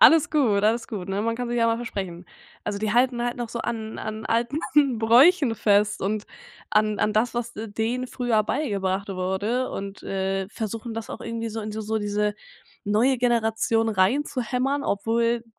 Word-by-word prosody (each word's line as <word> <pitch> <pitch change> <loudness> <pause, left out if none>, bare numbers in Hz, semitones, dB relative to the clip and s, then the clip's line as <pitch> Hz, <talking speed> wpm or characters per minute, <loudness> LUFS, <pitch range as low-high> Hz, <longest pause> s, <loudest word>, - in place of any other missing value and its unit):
Alles 325 -2 +7
gut, 235 -10 +2
alles 230 +2 +1
gut, 195 -5 -5
ne? 195 +2 -1
Man 230 +1 -1
kann 245 0 -3
sich 240 - -1
ja 230 - +3
mal 230 0 +2
versprechen. 190 -7 -5 0.4
Also, 200 - -2
die 215 0 -1
halten 245 0 +2
halt 240 0 -1
noch 240 -2 -4
so 235 0 -4
an 220 -2 -4
an 220 0 -5
alten 235 +5 0 0.4
Bräuchen 250 +5 +5
fest 210 -1 +2
und 210 +2 -1 0.5
an 215 0 +2
an 210 - +1
das, 220 +3 +1
was 240 0 -3
d 220 +1 -6
denen 235 +4 -2
früher 240 -4 +1
beigebracht 200 -7 -1
wurde 195 +7 -1
und, 195 0 -6
äh, 195 0 -2
versuchen 225 +1 -5
das 225 0 -5
auch - - -6
irgendwie 230 0 -4
so 225 0 -5
in 215 - -5
so 220 +1 -2
diese 205 0 0 0.5
neue 230 +6 +2
Generation 225 -1 +1
reinzuhämmern, 250 +5 +1
obwohl 230 +2 0
225 Hz, 175 wpm, -25 LUFS, 205-240 Hz, 0.5 s, Alles